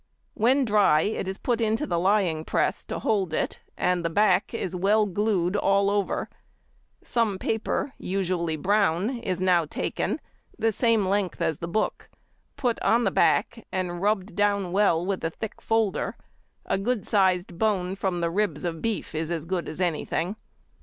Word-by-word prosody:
When 255 +5 +3
dry 205 -8 +4
it 205 0 -2
is 190 0 -3
put 240 0 -1
into 220 0 +1
the 170 -2 0
lying 185 -4 +2
press - - 0
to - - -4
hold 190 -7 0
it, - - -2 0.2
and 180 -1 +1
the 170 - 0
back 190 +1 +3
is 190 -6 -3
well 205 +4 +3
glued 200 -2 0
all 200 0 +3
over; 205 -1 -1 0.8
some 225 -5 0
paper, 225 +7 -2
usually 180 -4 -1
brown, 200 - +1
is 185 -6 -2
now 180 -3 +3
taken, - - -2 0.4
the 225 - +2
same 225 -1 +2
length 195 -1 0
as 160 - 0
the 170 - -4
book, 215 +5 -2 0.5
put 250 -4 0
on 235 +2 +3
the - - +2
back, - - +1
and 180 -2 -3
rubbed 205 0 0
down 200 -3 +1
well 180 -3 +3
with 195 -1 -2
a 165 - +1
thick 215 +6 -7
folder: 225 -3 0 0.5
a - - 0
good 220 -1 -1
sized 185 -4 +1
bone 190 -4 +1
from 190 -3 -2
the 170 0 0
ribs 175 -6 -1
of 165 -2 -3
beef 225 -6 -2
is 160 0 -2
as 165 -2 -3
good 175 -2 -2
as 155 - -8
anything. 175 +2 -1
195 Hz, 170 wpm, -26 LUFS, 175-215 Hz, 0.8 s, dry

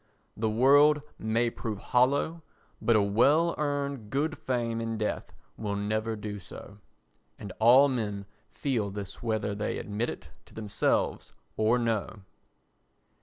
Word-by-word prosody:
The 110 0 -1
world 145 +6 +5 0.2
may 115 +2 +1
prove 110 -3 -5
hollow 140 +9 +1 0.4
but 115 - +3
a 105 - +4
well 140 +12 +3
earned 140 -6 -2
good 150 +6 -1
fame 115 -3 -2
in 115 -1 -3
death 110 -1 -3 0.3
will 105 -2 -3
never 110 +2 -1
do 105 -1 -6
so. 100 +2 -11 0.6
And 100 -3 -8
all 125 +5 +7
men 105 -6 -3 0.2
feel 120 -8 -2
this 100 0 -7
whether 110 -3 -1
they 105 +1 -3
admit 105 +3 -3
it - - -8 0.2
to - - -19
themselves 105 -2 -1 0.2
or 110 +3 +3
no. 110 -3 -2
115 Hz, 135 wpm, -28 LUFS, 105-130 Hz, 0.6 s, all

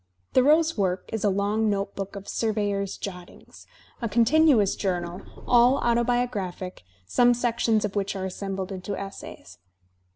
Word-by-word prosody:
Thoreau's 310 +5 +4
work 185 -1 -1
is 220 - -2
a 205 - +3
long 205 +3 +1
notebook 200 -1 -3
of 200 0 -8
"surveyor's" 205 -3 -1
jot 180 -3 -7
tings, - - -17 0.3
a 230 - -2
continuous 240 -2 +4
journal, 180 -2 -3 0.2
all 245 +2 +5
autobiographic, 235 -6 -1 0.2
some 245 - +4
sections 230 -2 +1
of 205 - -5
which 200 -1 -1
are 190 -1 -3
assembled 190 0 -4
into 190 +1 -5
essays. 145 - -9
205 Hz, 135 wpm, -25 LUFS, 190-235 Hz, 0.3 s, all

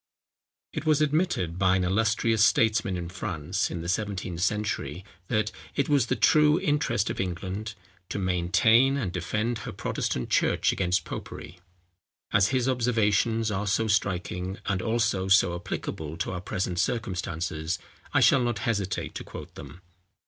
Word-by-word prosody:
It - - -3
was 155 -2 +3
admitted 150 - 0
by 95 -1 +4
an 95 - +1
illustrious 110 +3 +2
statesman 110 -4 +3
in 85 -1 -4
France, 90 0 -2
in 85 - -4
the 85 - -6
seventeenth 90 -2 -2
century, 100 -5 -1 0.2
that 105 0 0 0.2
it 140 0 0
was 140 -5 +3
the - - +1
true 150 +1 +4
interest 150 - 0
of - - -6
England 95 +4 -4 0.3
to - - -3
maintain 100 +8 +3
and 105 -10 -2
defend 110 +7 -2
her 95 - -6
Protestant 65 - -3
church - - +2
against 90 -1 0
popery. 90 - -8 0.7
As 100 -1 +5
his 130 +2 0
observations 115 -3 +1
are 105 +1 -2
so 110 +3 +1
striking, 95 -2 -1
and 95 -2 0
also 115 -4 0
so 95 -2 +5
applicable 80 -2 -5
to 90 - -2
our 90 -1 -4
present 90 -1 -2
circumstances, 85 -7 -2 0.3
I - - +3
shall 135 - +5
not 120 -2 0
hesitate 100 -6 -1
to - - -6
quote - - -10
them. 90 - -11
100 Hz, 150 wpm, -27 LUFS, 90-115 Hz, 0.7 s, As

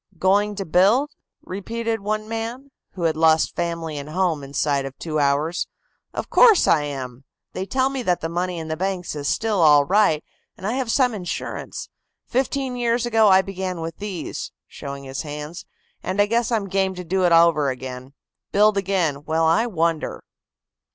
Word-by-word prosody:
"Going 205 +4 +2
to 195 -1 -4
build?" 205 - +3 0.3
repeated 225 +4 -3
one 215 +1 -2
man, 230 +5 -5 0.2
who 180 - -5
had 160 -2 +2
lost 160 0 +3
family 165 -3 -3
and 140 +1 -8
home 165 -3 0
inside 140 0 0
of 135 0 -7
two 155 -2 -3
hours. 145 +4 +1 0.4
"Of - - -4
course, 450 -6 +6
I 150 -3 +3
am. 130 -3 -6 0.3
They 190 - -4
tell 260 +3 +1
me 270 -1 -3
that 180 -7 +1
the 165 - -3
money 175 +1 -2
in 160 -1 -5
the 160 - -2
banks 180 -1 -3
is 145 -1 -4
still 215 0 +1
all 145 -3 +6
right, 190 -3 +3 0.3
and 190 - -9
I 210 - 0
have 260 -2 -2
some 250 0 +3
insurance. 180 -4 -5 0.4
Fifteen 265 0 -1
years 240 0 0
ago 225 -2 +4
I 190 -1 +6
began 190 -2 -4
with 165 0 -5
these," 200 -4 -5
showing 140 0 -8
his 135 0 -5
hands, 150 +2 -7 0.3
"and 185 +2 -3
I 205 - +6
guess 230 +3 0
I'm 215 -4 0
game 190 0 0
to 180 - -6
do 185 +2 0
it 175 - +3
over 165 -4 +5
again. 130 +1 -7 0.4
Build 210 0 +4
again, 180 -7 0
well 160 +1 +1
I 190 +9 +3
wonder." 165 -6 -1
180 Hz, 180 wpm, -22 LUFS, 155-215 Hz, 0.4 s, course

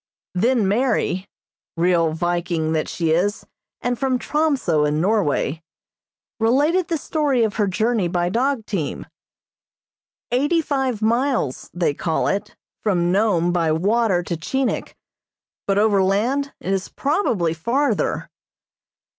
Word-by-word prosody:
Then 225 +3 +2
Mary, 200 -4 0 0.5
(real 170 -1 +3
Viking 170 -1 -1
that 155 -1 -1
she 165 -2 -1
is, 190 +6 0 0.4
and 245 -1 -1
from 265 -2 +1
Tromso, 270 - +1
in 150 +1 +1
Norway,) 170 -5 +1 0.8
related 295 +10 +2
the 330 - 0
story 285 -5 0
of 215 -2 -1
her 210 -2 +2
journey 215 0 +1
by 175 0 0
dog 245 +2 0
team. 180 -10 -3 1.3
Eighty 290 +7 +2
five 265 -7 -1
miles, 235 - 0
they 175 -4 0
call 160 +2 -1
it, 205 +2 -2 0.3
from 175 -5 +1
Nome 180 -4 +2
by 165 -3 +1
water 195 +2 +2
to 175 - -3
Chinik, 260 +11 -2 0.7
but 195 0 +2
overland 215 +7 +2
it 190 - -2
is 195 -1 -2
probably 255 - 0
farther. 245 - 0
205 Hz, 120 wpm, -21 LUFS, 175-255 Hz, 1.3 s, real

